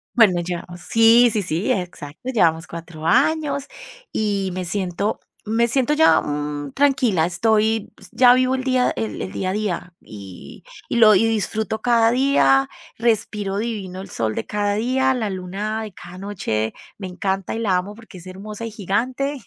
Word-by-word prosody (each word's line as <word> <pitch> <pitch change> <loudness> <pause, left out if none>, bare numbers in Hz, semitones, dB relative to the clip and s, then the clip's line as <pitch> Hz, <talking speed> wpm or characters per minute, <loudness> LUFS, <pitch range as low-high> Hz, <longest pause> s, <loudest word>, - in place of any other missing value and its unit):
Bueno, 195 -7 +5
llevamos 175 0 -6
Sí, 230 +4 +5
sí, 210 - 0
sí, 190 +8 -1
exacto, 180 - -5
llevamos 165 -6 +2
4 165 -1 -9
años 280 - +2 0.4
y 200 -3 -1
me 185 -1 -4
siento 190 +2 -2 0.3
me 235 +1 +2
siento 265 +3 +1
ya, 320 +1 +5
mm, 145 -1 -4
tranquila, 260 - +2
estoy, 220 +4 +1
pues - - -14
ya 245 -1 +6
vivo 255 0 +2
el 260 0 -4
día 255 -1 +2
el 110 -1 -3
el 95 - -5
día 185 - -2
a - - -2
día, 195 -4 -3
y 100 -4 -11 0.3
y - - -1
lo 215 -3 +7
y 205 - +4
disfruto 220 0 -1
cada 230 -2 +3
día, 240 - +3 0.3
respiro 210 -3 0
divino 200 -5 -4
el 195 - -10
sol 110 -6 -2
de 110 - -3
cada 205 -1 -1
día, 260 +4 +1
la 220 -5 -2
luna 195 +4 -4
de 210 -4 -8
cada 180 +1 -12
noche, 175 - -3 0.2
me 190 -2 -6
encanta 190 +2 -3
y - - -3
la 195 -5 +1
amo 200 +3 -4
porque 225 -4 -14
es 180 +1 -12
hermosa 210 +4 -7
y 225 - -6
gigante. 250 +8 -2
205 Hz, 175 wpm, -21 LUFS, 180-235 Hz, 0.4 s, lo